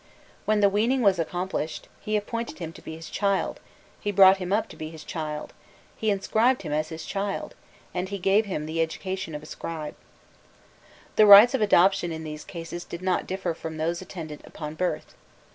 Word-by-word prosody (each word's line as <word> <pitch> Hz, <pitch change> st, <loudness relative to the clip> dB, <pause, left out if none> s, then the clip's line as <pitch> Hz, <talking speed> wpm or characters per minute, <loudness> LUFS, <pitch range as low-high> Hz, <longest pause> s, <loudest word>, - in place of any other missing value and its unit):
When 215 Hz, -1 st, +2 dB
the 200 Hz, -, +6 dB
weaning 235 Hz, +6 st, +2 dB
was 195 Hz, -4 st, +4 dB
accomplished, 175 Hz, -2 st, -3 dB
"he 215 Hz, 0 st, -1 dB
appointed 230 Hz, +3 st, -4 dB
him 165 Hz, -2 st, -6 dB
to -, -, -13 dB
be 160 Hz, -, -7 dB
his 165 Hz, 0 st, -9 dB
child, 200 Hz, -1 st, 0 dB, 0.4 s
he 205 Hz, -, -2 dB
brought 195 Hz, 0 st, +7 dB
him 180 Hz, -1 st, -5 dB
up 215 Hz, +2 st, +2 dB
to -, -, -11 dB
be 155 Hz, -, -6 dB
his 160 Hz, -1 st, -10 dB
child, 155 Hz, -2 st, -5 dB, 0.4 s
he 220 Hz, -, -1 dB
inscribed 220 Hz, +5 st, +2 dB
him 150 Hz, -3 st, -3 dB
as 155 Hz, +1 st, 0 dB
his 160 Hz, -1 st, -7 dB
child, 200 Hz, 0 st, -3 dB, 0.4 s
and 180 Hz, +1 st, -2 dB
he 200 Hz, -, -3 dB
gave 195 Hz, +3 st, +3 dB
him 155 Hz, -6 st, -3 dB
the 160 Hz, +1 st, -1 dB
education 165 Hz, 0 st, -3 dB
of 150 Hz, -, -6 dB
a -, -, -10 dB
scribe." 155 Hz, -1 st, -6 dB, 1.2 s
The 215 Hz, -, +7 dB
rites 205 Hz, +5 st, +10 dB
of 265 Hz, -, +1 dB
adoption 195 Hz, -3 st, +4 dB
in 160 Hz, 0 st, -5 dB
these 150 Hz, -1 st, -6 dB
cases 170 Hz, 0 st, -7 dB
did 170 Hz, +1 st, -8 dB
not 185 Hz, -1 st, 0 dB
differ 185 Hz, -2 st, -2 dB
from 160 Hz, -1 st, -7 dB
those 170 Hz, +3 st, -1 dB
attendant 160 Hz, -5 st, -8 dB
upon 150 Hz, -1 st, -7 dB
birth. 180 Hz, +3 st, -2 dB
180 Hz, 195 wpm, -26 LUFS, 160-200 Hz, 1.2 s, rites